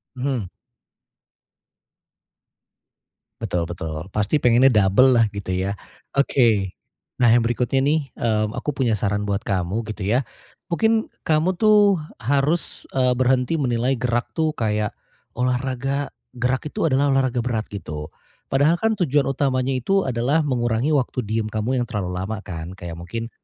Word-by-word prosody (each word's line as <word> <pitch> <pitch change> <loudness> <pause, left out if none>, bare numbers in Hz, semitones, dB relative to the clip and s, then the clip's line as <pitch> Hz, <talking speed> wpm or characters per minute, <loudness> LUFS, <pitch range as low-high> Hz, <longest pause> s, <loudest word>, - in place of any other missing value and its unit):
Mhm. 130 -5 -2 2.9
Betul 85 -1 -2
betul 80 0 -5
pasti 105 +9 0
pengennya 125 +2 +5
dobellah 110 +3 +5
gitu 100 -2 -5
ya, 95 +2 -1 0.4
oke, 115 -9 +2 0.5
nah 120 - +6
yang 115 0 +4
berikutnya 120 +3 0
nih, 145 -1 +1
eee, 110 -2 +1
aku 150 +7 -3
punya 120 -5 +1
saran 105 +1 -1
buat 100 +2 -1
kamu 95 +4 -1
gitu 105 - -12
ya, 125 +4 +2 0.5
mungkin 220 +4 +2 0.2
kamu 160 +4 +2
tuh 205 -2 +4 0.2
harus, 140 +6 -1
eee, 125 -1 +3
berhenti 125 +2 +1
menilai 125 0 +1
gerak 120 -1 -1
tuh 160 -2 -1
kayak 105 -2 0 0.5
olahraga 130 +2 -1 0.2
gerak 125 +2 -1
itu 150 +2 -1
adalah 140 +1 +2
olahraga 130 -2 +1
berat 110 -3 -2
gitu, 75 -6 -6 0.4
padahal 145 +4 +3
kan 220 -1 +1
tujuan 145 -6 +2
utamanya 135 -1 0
itu 195 +10 +1
adalah 130 +3 +1
mengurangi 120 -2 0
waktu 135 -4 +1
diem 110 0 -2
kamu 110 +4 -1
yang 120 - 0
terlalu 95 -6 -3
lama 105 +3 -4
kan? 85 -2 -7
Kayak 85 -3 -8
mungkin, 115 +7 -5
125 Hz, 140 wpm, -22 LUFS, 105-135 Hz, 2.9 s, nah